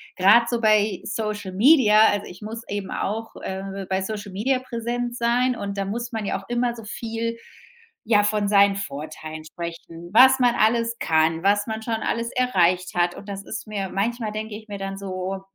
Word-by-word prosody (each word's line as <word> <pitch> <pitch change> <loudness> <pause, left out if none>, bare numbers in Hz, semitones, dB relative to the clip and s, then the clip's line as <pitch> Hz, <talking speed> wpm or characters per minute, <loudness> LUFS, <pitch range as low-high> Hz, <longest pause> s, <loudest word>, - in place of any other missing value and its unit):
grad 210 +5 +5
so 235 -1 -1
bei 215 -3 +3
Social 210 -3 -4
Media 215 -1 +6
also, 205 - -3
ich 180 - -12
muss 225 +2 -6
eben 200 -1 -4
auch, 225 +3 -3
äh, 195 0 -5
bei 190 0 0
Social 205 0 -5
Media 255 +7 0
präsent 240 -1 -4
sein 245 +2 +2
und 200 0 -5
da 195 - 0
muss 235 +4 -4
man 220 -2 -3
ja 195 - -2
auch - - -18
immer 240 0 0
so 225 -2 -10
viel, 230 +1 -4 0.7
ja, 210 -2 +4
von 210 -1 +1
seinen 200 -1 +5
Vorteilen 155 -1 -7
sprechen, 170 +1 -8
was 260 +3 +7
man 245 -2 +3
alles 230 +1 +2
kann, 160 +1 +1
was 205 +2 +2
man 220 0 -4
schon 225 0 -2
alles 230 +1 -2
erreicht 185 -8 +1
hat. 175 0 +1
Und 200 - -11
das 200 0 -5
ist 220 - -6
mir 200 -3 -3
manchmal 225 +2 -2
denke 215 0 -5
ich 220 0 -11
mir 200 - -5
dann 195 0 -5
so: 190 0 -4
210 Hz, 195 wpm, -23 LUFS, 195-230 Hz, 0.7 s, was